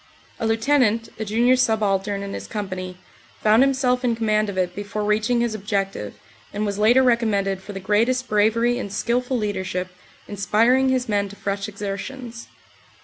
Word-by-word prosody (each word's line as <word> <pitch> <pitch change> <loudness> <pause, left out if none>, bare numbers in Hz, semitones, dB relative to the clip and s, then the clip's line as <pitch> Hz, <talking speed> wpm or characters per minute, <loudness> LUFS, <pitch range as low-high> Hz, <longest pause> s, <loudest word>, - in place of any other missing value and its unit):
A 225 - -1
Lieutenant, 225 -1 +2
a 220 - -2
junior 235 +5 +3
subaltern 205 -4 0
in 200 - -6
his - - -6
company, 185 -4 -5 0.5
found 215 +3 +5
himself 260 -2 +2
in 240 -2 +1
command 215 -2 +1
of 195 - -6
it 180 -1 0
before 205 +1 -4
reaching 215 +3 +1
his 235 -2 0
objective 195 - -3 0.4
and 210 +1 -2
was 200 0 -3
later 240 +5 +5
recommended 205 -6 +1
for 205 - -9
the 195 - -5
greatest 230 +6 +1
bravery 230 +4 +2
and 200 - -5
skilful 245 +5 -1
leadership, 190 -4 -3 0.4
inspiring 230 +6 +2
his 255 -1 0
men 205 -2 0
to 205 - -11
fresh 200 0 -3
exertions. 210 +4 -6
215 Hz, 160 wpm, -22 LUFS, 200-240 Hz, 0.5 s, found